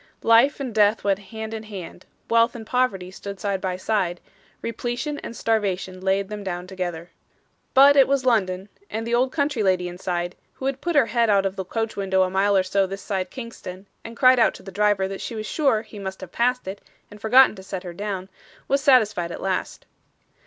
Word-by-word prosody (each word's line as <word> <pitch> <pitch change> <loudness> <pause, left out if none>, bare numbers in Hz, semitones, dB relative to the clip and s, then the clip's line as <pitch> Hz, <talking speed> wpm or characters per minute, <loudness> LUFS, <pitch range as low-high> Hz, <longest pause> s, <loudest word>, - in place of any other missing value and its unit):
Life 230 +6 +5
and 260 -4 -4
death 210 0 +3
went 195 -1 +1
hand 220 -1 -6
in 220 - -4
hand; 195 -4 -9 0.2
wealth 230 +1 +3
and 225 -2 -7
poverty 215 -8 0
stood 200 0 -8
side 200 -2 -2
by 185 -2 -2
side; 185 -3 -1 0.4
repletion 240 +6 -3
and 230 - -8
starvation 190 -4 -1
laid 195 +1 +1
them 210 0 -6
down 180 -2 -4
together. 175 -2 -5 0.6
But 280 +2 +8
it 275 -2 +6
was 275 -2 +1
London; 195 -6 +1 0.2
and 225 +1 -4
the 235 - -3
old 255 +2 +2
country 285 -5 0
lady 185 -3 +2
inside, 175 0 -3 0.2
who 265 - -8
had 270 0 -2
put 345 -1 -2
her 285 -4 +6
head 235 -1 +1
out 200 -1 +3
of 195 0 -1
the 190 - -3
coach 225 +4 -3
window 190 -1 +2
a 185 - -1
mile 195 +1 +3
or 190 - +3
two 195 +1 +1
this 195 +1 -7
side 190 -3 -2
Kingston, 205 -6 -8 0.2
and 230 0 -9
cried 255 -1 +6
out 230 - +4
to - - -12
the 195 - -9
driver 205 -1 +2
that 195 0 -6
she 230 - -5
was 215 -1 -4
sure 260 -5 +1
he 210 - -11
must 190 -1 -6
have 185 -2 -9
passed 250 -1 0
it 195 +1 -6 0.3
and 210 0 -13
forgotten 250 +2 +6
to - - -9
set 190 -1 -6
her 175 -2 -7
down, 195 0 -4 0.4
was 275 +1 +2
satisfied 215 - +3
at - - -6
last. 190 -1 -3
205 Hz, 215 wpm, -23 LUFS, 190-235 Hz, 0.6 s, But